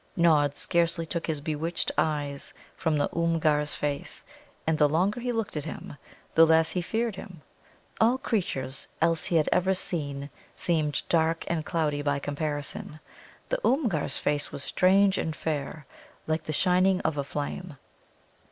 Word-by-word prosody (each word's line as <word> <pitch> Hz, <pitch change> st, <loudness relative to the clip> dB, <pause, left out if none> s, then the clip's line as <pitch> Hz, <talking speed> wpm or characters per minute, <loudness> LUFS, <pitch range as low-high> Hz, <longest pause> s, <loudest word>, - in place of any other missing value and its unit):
Nod 150 Hz, -4 st, +4 dB
scarcely 170 Hz, -1 st, +1 dB
took 170 Hz, +1 st, -3 dB
his 155 Hz, -3 st, -1 dB
bewitched 160 Hz, +2 st, -2 dB
eyes 145 Hz, -2 st, -1 dB, 0.2 s
from 160 Hz, -2 st, 0 dB
the 145 Hz, -, +2 dB
Oomgar's 155 Hz, -3 st, +2 dB
face, 145 Hz, -1 st, -3 dB, 0.4 s
and 160 Hz, -1 st, +1 dB
the 150 Hz, -1 st, +5 dB
longer 185 Hz, +9 st, +1 dB
he 245 Hz, +1 st, -1 dB
looked 225 Hz, -6 st, -2 dB
at 150 Hz, -, -3 dB
him, -, -, -7 dB, 0.4 s
the 165 Hz, -, +7 dB
less 160 Hz, 0 st, +4 dB
he 180 Hz, -, -1 dB
feared 225 Hz, +3 st, -1 dB
him. 175 Hz, -8 st, -10 dB, 0.6 s
All 235 Hz, +3 st, +4 dB
creatures 175 Hz, -, -2 dB
else 165 Hz, 0 st, +2 dB
he 175 Hz, -, 0 dB
had 155 Hz, -2 st, +4 dB
ever 190 Hz, +1 st, +3 dB
seen 145 Hz, -6 st, -3 dB, 0.2 s
seemed 155 Hz, -4 st, 0 dB
dark 165 Hz, 0 st, +2 dB
and 165 Hz, -2 st, -1 dB
cloudy 155 Hz, -3 st, 0 dB
by 145 Hz, -1 st, +1 dB
comparison. 145 Hz, +1 st, -4 dB, 0.5 s
The -, -, 0 dB
Oomgar's 220 Hz, -, +1 dB
face 145 Hz, 0 st, -1 dB
was 140 Hz, -, -6 dB
strange 195 Hz, +4 st, +4 dB
and 160 Hz, -1 st, -2 dB
fair, 150 Hz, -1 st, -3 dB, 0.4 s
like 155 Hz, 0 st, -1 dB
the -, -, -3 dB
shining 185 Hz, +4 st, +3 dB
of 160 Hz, -, 0 dB
a 140 Hz, -, -1 dB
flame. 145 Hz, +3 st, -5 dB
160 Hz, 155 wpm, -28 LUFS, 145-180 Hz, 0.6 s, the